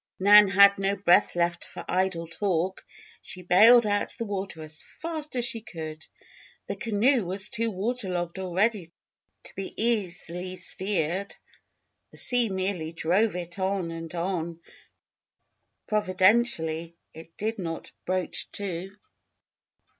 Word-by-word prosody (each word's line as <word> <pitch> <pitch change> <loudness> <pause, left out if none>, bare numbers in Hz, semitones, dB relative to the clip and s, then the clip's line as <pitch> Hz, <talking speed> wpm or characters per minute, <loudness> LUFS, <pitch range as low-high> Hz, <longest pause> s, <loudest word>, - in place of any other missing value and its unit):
Nan 205 +2 +8
had 200 +1 +6
no 195 +1 +1
breath 195 -1 +3
left 170 0 0
for - - -9
idle 185 -2 0
talk. 185 +1 -2 0.4
She 180 - -8
bailed 225 +7 +7
out 205 -1 0
the 230 - -3
water 195 -5 -5
as 155 +1 -7 0.2
fast 315 -3 -4
as 245 -1 +1
she 235 -2 -3
could. 160 -5 -8 0.6
The 200 - -4
canoe 230 +3 +2
was 190 +2 -2
too 230 +1 0
water 215 +2 -2
logged 175 0 -3
already 190 0 0 0.5
to - - -7
be 195 0 -5
easily 185 -5 -2
steered. 190 0 -2 0.7
The - - -13
sea 245 -3 +2
merely 185 -4 -2
drove 180 +6 +1
it 175 +1 -6
on 190 -2 -1
and 165 +1 -7
on; 170 -1 -3 1.3
providentially 185 -5 +1 0.2
it 165 +1 -13
did 220 +1 -2
not 165 -3 -5 0.2
broach 185 0 -2
to. 190 -1 -5
190 Hz, 130 wpm, -27 LUFS, 170-210 Hz, 1.3 s, Nan